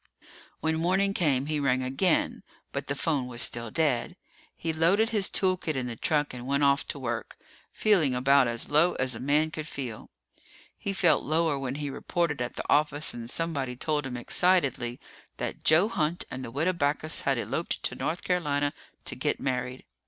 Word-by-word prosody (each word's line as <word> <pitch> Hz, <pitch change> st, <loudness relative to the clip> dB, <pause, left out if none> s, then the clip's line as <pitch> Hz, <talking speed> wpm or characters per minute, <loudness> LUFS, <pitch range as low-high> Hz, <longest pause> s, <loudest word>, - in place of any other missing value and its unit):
When 160 Hz, 0 st, +1 dB
morning 190 Hz, +4 st, +2 dB
came, 140 Hz, -8 st, +2 dB
he 150 Hz, 0 st, -1 dB
rang 130 Hz, -2 st, +1 dB
again, 135 Hz, +7 st, +1 dB, 0.3 s
but -, -, -4 dB
the 140 Hz, -, -1 dB
phone 140 Hz, -4 st, 0 dB
was 120 Hz, -1 st, -7 dB
still 115 Hz, -1 st, +1 dB
dead. 135 Hz, -2 st, 0 dB, 0.4 s
He 165 Hz, -1 st, -2 dB
loaded 185 Hz, +8 st, +3 dB
his 210 Hz, -5 st, +2 dB
tool 185 Hz, -1 st, +1 dB
kit 160 Hz, -4 st, -3 dB
in 130 Hz, -1 st, -2 dB
the 120 Hz, -2 st, -5 dB
truck 150 Hz, +3 st, 0 dB
and 125 Hz, 0 st, -7 dB
went 140 Hz, +1 st, +1 dB
off 140 Hz, 0 st, +3 dB
to -, -, -4 dB
work, 115 Hz, -4 st, -4 dB, 0.3 s
feeling 170 Hz, -12 st, +2 dB
about 135 Hz, +1 st, +4 dB
as 120 Hz, +3 st, 0 dB
low 155 Hz, +4 st, +4 dB
as 130 Hz, 0 st, 0 dB
a 115 Hz, -, -5 dB
man 150 Hz, +4 st, +1 dB
could 155 Hz, -1 st, -6 dB
feel. 125 Hz, -8 st, -6 dB, 0.7 s
He 200 Hz, -, -3 dB
felt 175 Hz, -5 st, +3 dB
lower 155 Hz, -1 st, +1 dB
when 135 Hz, -1 st, -3 dB
he 145 Hz, -1 st, -4 dB
reported 160 Hz, -2 st, -1 dB
at 120 Hz, -, -3 dB
the -, -, -5 dB
office 150 Hz, 0 st, +2 dB
and 115 Hz, -1 st, -7 dB
somebody 140 Hz, -5 st, -2 dB
told 150 Hz, +1 st, -1 dB
him 125 Hz, -2 st, -5 dB
excitedly 130 Hz, -5 st, +1 dB, 0.4 s
that -, -, -4 dB
Joe 160 Hz, +6 st, +5 dB
Hunt 170 Hz, -5 st, -1 dB
and 130 Hz, -, -5 dB
the -, -, -6 dB
Widow 155 Hz, +9 st, 0 dB
Backus 155 Hz, -1 st, +1 dB
had -, -, +1 dB
eloped -, -, -3 dB
to -, -, -1 dB
North 170 Hz, +2 st, -3 dB
Carolina 145 Hz, -5 st, 0 dB, 0.3 s
to -, -, -3 dB
get -, -, -1 dB
married. 125 Hz, -1 st, -3 dB
145 Hz, 190 wpm, -28 LUFS, 130-165 Hz, 0.7 s, Joe